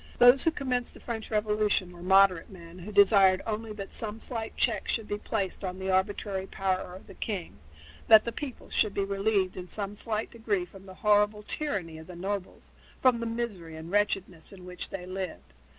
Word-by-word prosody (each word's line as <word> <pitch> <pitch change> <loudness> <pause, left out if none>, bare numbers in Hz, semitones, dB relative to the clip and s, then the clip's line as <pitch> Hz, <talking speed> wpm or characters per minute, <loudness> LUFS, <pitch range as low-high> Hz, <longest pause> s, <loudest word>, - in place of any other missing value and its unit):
Those 245 +2 +7
who - - +5
commenced 255 -6 -2
the - - -12
French 225 -2 -5
Revolution 210 -3 +1
were 175 -1 -12
moderate 190 -1 +4
men 175 -2 -12
who 190 +4 -8
desired 195 -2 +6
only 220 0 -3
that 200 -2 -7
some 215 -1 -4
slight 225 -1 -5
check - - +1
should 225 -3 -1
be 205 - -3
placed 200 -3 -3
on 185 -1 -3
the 190 0 -2
arbitrary 190 0 0
power 185 -2 -2
of 190 - -12
the 195 - -12
king 190 - -5 0.5
that 220 -1 +8
the 235 - -2
people 270 0 -7
should 210 -2 +2
be 200 - +1
relieved 195 -1 0
in 180 -1 -6
some 200 +1 -3
slight 215 +1 -3
degree 215 -5 -1
from 195 +2 -15
the 185 - -10
horrible 210 +1 +3
tyranny 195 - -3
of 160 - -12
the 180 - -9
nobles, 190 +2 -5 0.3
from 255 -3 +4
the 230 - -2
misery 215 -9 -4
and 160 +2 -8
wretchedness 195 -4 0
in 185 -2 -12
which 180 -1 -2
they 185 -2 -6
lived. 185 - -6
200 Hz, 200 wpm, -29 LUFS, 185-220 Hz, 0.5 s, that